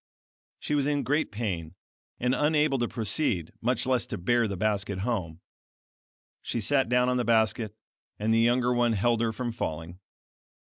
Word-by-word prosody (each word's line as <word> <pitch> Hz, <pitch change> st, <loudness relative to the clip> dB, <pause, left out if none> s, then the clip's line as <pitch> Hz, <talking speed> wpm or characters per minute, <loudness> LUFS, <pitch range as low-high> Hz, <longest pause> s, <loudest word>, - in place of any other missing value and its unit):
She -, -, -3 dB
was 145 Hz, -1 st, +2 dB
in 145 Hz, -1 st, 0 dB
great 145 Hz, +3 st, 0 dB
pain, 95 Hz, -7 st, -4 dB, 0.4 s
and 125 Hz, +1 st, +1 dB
unable 150 Hz, -1 st, +2 dB
to 120 Hz, -, 0 dB
proceed, 105 Hz, -, -1 dB
much 125 Hz, +1 st, 0 dB
less 130 Hz, -2 st, +1 dB
to -, -, -4 dB
bear 120 Hz, +6 st, +2 dB
the 100 Hz, -2 st, -4 dB
basket 100 Hz, -1 st, -1 dB
home. 95 Hz, -7 st, -3 dB, 1.0 s
She 120 Hz, -, -3 dB
sat 135 Hz, +3 st, +2 dB
down 125 Hz, 0 st, +3 dB
on 125 Hz, 0 st, +1 dB
the 125 Hz, -, +1 dB
basket, 110 Hz, -2 st, +1 dB, 0.4 s
and 110 Hz, +2 st, 0 dB
the 115 Hz, -, +4 dB
younger 120 Hz, +1 st, +3 dB
one 120 Hz, -1 st, +2 dB
held 115 Hz, +3 st, +1 dB
her 115 Hz, -1 st, +1 dB
from 120 Hz, +1 st, -4 dB
falling. 85 Hz, -3 st, -5 dB
115 Hz, 165 wpm, -27 LUFS, 100-125 Hz, 1.0 s, the